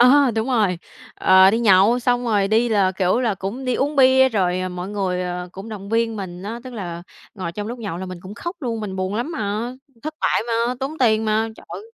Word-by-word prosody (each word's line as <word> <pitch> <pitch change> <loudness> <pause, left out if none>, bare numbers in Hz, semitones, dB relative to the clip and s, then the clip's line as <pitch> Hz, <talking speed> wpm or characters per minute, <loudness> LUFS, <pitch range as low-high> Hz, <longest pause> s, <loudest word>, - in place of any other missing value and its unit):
Ờ, 265 +2 +6
đúng 220 +3 -1
rồi, 210 -8 +1 0.4
ờ, 190 0 +6
đi 225 - +1
nhậu 210 +2 +5
xong 245 0 +1
rồi 205 -4 +1
đi 230 +3 +3
là, 195 -4 +2
kiểu, 190 +5 +1
là 225 -5 +1
cũng 200 +9 -5
đi 250 -1 0
uống 285 +1 -1
bia, 265 0 +6
rồi, 185 -5 0
à, 185 - -2
mọi 180 +1 -6
người, 190 -3 -2
ờ, 180 0 -4
cũng 195 +4 -9
động 200 -2 -7
viên 225 0 0
mình 180 -2 -7
á, 230 +4 -5
tức 255 - -8
là 175 -6 -6 0.3
ngồi 185 -4 -5
trong 210 +3 -5
lúc 240 +2 -6
nhậu 205 -7 -5
là 190 - -5
mình 185 -1 -7
cũng 190 +3 -9
khóc 345 +8 -6
luôn, 230 -4 -3
mình 190 -3 -5
buồn 190 +2 -2
lắm 245 +9 -2
mà, 220 0 -2 0.3
thất 310 +1 -5
bại - - +2
mà, 235 +1 0
tốn 290 +4 -4
tiền 220 -3 +3
mà. 220 +1 +1
Trời! - - -9
215 Hz, 240 wpm, -21 LUFS, 190-240 Hz, 0.4 s, Ờ